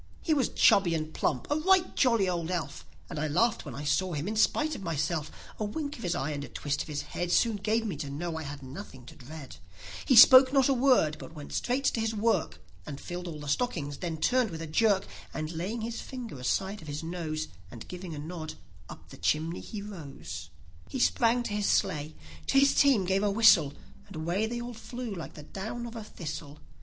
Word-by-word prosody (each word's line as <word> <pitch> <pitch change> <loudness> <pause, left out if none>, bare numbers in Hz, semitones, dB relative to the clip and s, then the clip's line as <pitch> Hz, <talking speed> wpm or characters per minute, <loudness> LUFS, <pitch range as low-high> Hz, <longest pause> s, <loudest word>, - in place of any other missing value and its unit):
e 320 - +4
was 275 -5 +2
chubby 180 -4 +4
and 155 0 -3
plump, 130 - -1
a - - +4
right 370 +3 +3
jolly 230 -7 +3
old 170 -2 -1
elf, 180 -3 -4 0.2
And - - -5
I 155 - 0
laughed 230 +10 +1
when - - -7
I 145 - -6
saw 180 +5 +1
him, 150 +3 -3
in 215 - -2
spite 300 +8 +2
of - - -6
myself; 160 -2 -1 0.3
A - - -1
wink 285 +7 -3
of - - -11
his 175 -2 -1
eye 140 +2 -2
and 145 -1 -4
a - - -6
twist 145 -1 -2
of - - -6
his 150 -2 -3
head, 175 0 -3
Soon 225 +1 +3
gave 220 +3 0
me 200 -7 -2
to 140 -1 -5
know 160 +4 -4
I 160 - -4
had 145 -1 -7
nothing 130 -1 -9
to - - -12
dread; 135 - -10 0.5
e 260 - +5
spoke 255 +3 +10
not 270 -2 +4
a 275 - +4
word, 250 - +3
but 165 - -10
went 150 -2 -9
straight 255 +3 0
to 240 - +1
his 225 0 -1
work, 205 - 0 0.3
And 140 -1 -6
filled 175 0 -6
all 155 -3 -6
the 145 - -7
stockings; 145 - -1
then 170 -3 -3
turned 250 +7 +2
with 165 -2 -6
a - - -4
jerk, 195 +4 +2 0.3
And 155 0 -3
laying 185 +8 -3
his 230 +1 -4
finger 240 - -7
aside 190 +10 -1
of 155 - -12
his 150 +2 -4
nose, 160 -2 -4 0.2
And 115 +3 -10
giving 180 -2 -7
a - - -7
nod, 155 +1 -6 0.3
up - - -11
the - - -11
chimney 160 +3 0
he 210 -3 -7
rose; 170 -10 -8 0.4
e - - -4
sprang 240 -1 +3
to 220 - -4
his 210 -1 0
sleigh, 155 -6 0 0.3
to 275 - +2
his 275 0 +5
team 265 -9 +4
gave 190 +2 +1
a 205 - +2
whistle, 200 -9 +5 0.3
And 195 - -11
away 170 +7 -1
they 240 +1 -4
all 240 0 -6
flew 240 0 -6
like 170 -4 -7
the 150 - -9
down 220 +9 -6
of 235 0 -8
a 225 - -6
thistle. 150 -6 -7
180 Hz, 230 wpm, -29 LUFS, 155-230 Hz, 0.5 s, spoke